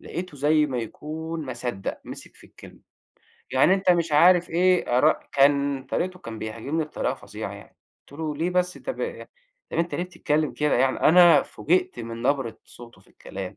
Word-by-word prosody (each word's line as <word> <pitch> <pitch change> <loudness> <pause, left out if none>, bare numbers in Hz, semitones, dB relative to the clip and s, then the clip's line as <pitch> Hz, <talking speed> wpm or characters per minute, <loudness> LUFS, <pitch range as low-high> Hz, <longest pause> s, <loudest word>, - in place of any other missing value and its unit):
لقيته 175 -3 -7
زي 150 +2 +3
ما 130 -4 -3
يكون 160 +7 -6
ما 130 - -4
صدّق 120 -5 -5
مسك - - -10
في - - -17
الكلمة. - - -16 0.7
يعني 135 +8 +4
أنت 190 -1 +1
مش 170 -3 +1
عارف 175 +3 +5
إيه 175 -7 +2
ار 150 +4 +5 0.2
كان 140 -1 +2
طريقته 185 0 -3
كان 115 -8 -8
بيهاجمني 115 +10 -3
بطريقة 150 - -3
فظيعة - - -8
يعني - - -14 0.3
قلت 145 - -10
له: 155 -2 -3
"ليه 165 +4 -1
بس، 180 0 0
طب - - -6 0.7
أنت 170 +1 -1
ليه 175 - -2
بتتكلّم 155 -4 -1
كده 150 0 0
يعني؟" 130 +1 +1
أنا 175 +1 +7
فوجئت 180 -3 -1
من 115 0 -7
نبرة 130 -3 -1
صوته 120 -6 -14
في - - -24
الكلام. 95 -1 -8
150 Hz, 175 wpm, -24 LUFS, 130-175 Hz, 0.7 s, أنا